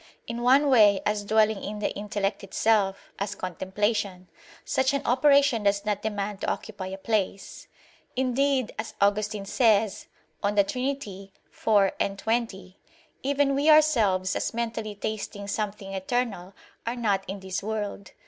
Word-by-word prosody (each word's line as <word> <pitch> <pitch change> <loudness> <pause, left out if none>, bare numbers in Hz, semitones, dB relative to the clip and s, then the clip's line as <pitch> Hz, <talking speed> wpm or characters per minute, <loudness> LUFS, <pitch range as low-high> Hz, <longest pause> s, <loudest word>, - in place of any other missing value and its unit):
In 235 +1 -5
one 265 +4 +5
way, 210 -7 +6
as 210 0 0
dwelling 215 0 +2
in 210 +1 -5
the 210 - -1
intellect 205 -1 -3
itself, 195 -1 0
as 200 +1 -3
contemplation; 190 +1 -2 0.4
such 265 +1 +1
an 280 - -2
operation 275 -1 +4
does 200 0 +1
not 210 -1 -1
demand 205 -2 -3
to - - -1
occupy 200 -4 -5
a 190 +1 -6
place; 200 -2 -2 0.5
indeed, 260 0 +1
as 220 - -5
Augustine 205 0 +1
says 215 -2 +2 0.3
(De 205 0 +3
Trin. 255 +7 -2
iv, 195 -2 -1
20): 195 -4 -2 0.4
"Even 280 0 +1
we 285 +3 +2
ourselves 225 -12 +4
as - - -2
mentally 225 -2 -3
tasting 205 -1 -5
something 205 -2 -4
eternal, 195 -2 -2 0.3
are 235 - -1
not 205 -5 0
in 195 +1 -4
this 190 -1 -4
world." 205 -2 -4
210 Hz, 140 wpm, -26 LUFS, 195-235 Hz, 0.5 s, way